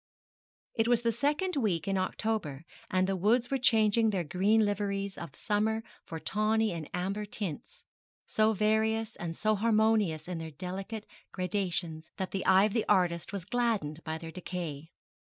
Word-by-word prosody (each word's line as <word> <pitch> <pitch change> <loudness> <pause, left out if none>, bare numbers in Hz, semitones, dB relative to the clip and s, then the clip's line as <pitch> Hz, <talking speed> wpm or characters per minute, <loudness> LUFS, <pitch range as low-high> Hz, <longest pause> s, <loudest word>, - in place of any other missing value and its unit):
It 225 -1 +1
was 240 -1 +3
the 230 - +3
second 295 - 0
week 195 - 0
in 195 - +1
October, 185 -6 -2 0.2
and 185 0 +2
the 195 0 0
woods 230 +7 +2
were 270 - +1
changing 225 -2 +4
their 190 -4 0
green 200 +7 +3
liveries 200 -1 -1
of 170 - -8
summer 220 +1 0 0.2
for 165 - -5
tawny 215 +3 +1
and 165 -3 -5
amber 195 +4 -2
tints, 210 - -6 0.4
so 215 0 +3
various 220 +1 +1
and 165 -1 -4
so 215 0 +2
harmonious 215 -6 +2
in 180 -2 -4
their 160 0 -5
delicate 190 +7 -6 0.3
gradations 180 -4 -2
that 190 -2 -3
the 195 - -2
eye 190 +1 +7
of 210 -1 +1
the 225 - 0
artist 175 -2 +2
was 195 -4 -5
gladdened 215 - -1
by 160 0 -3
their 165 0 -8
decay. 165 -4 -5
200 Hz, 165 wpm, -30 LUFS, 175-220 Hz, 0.4 s, eye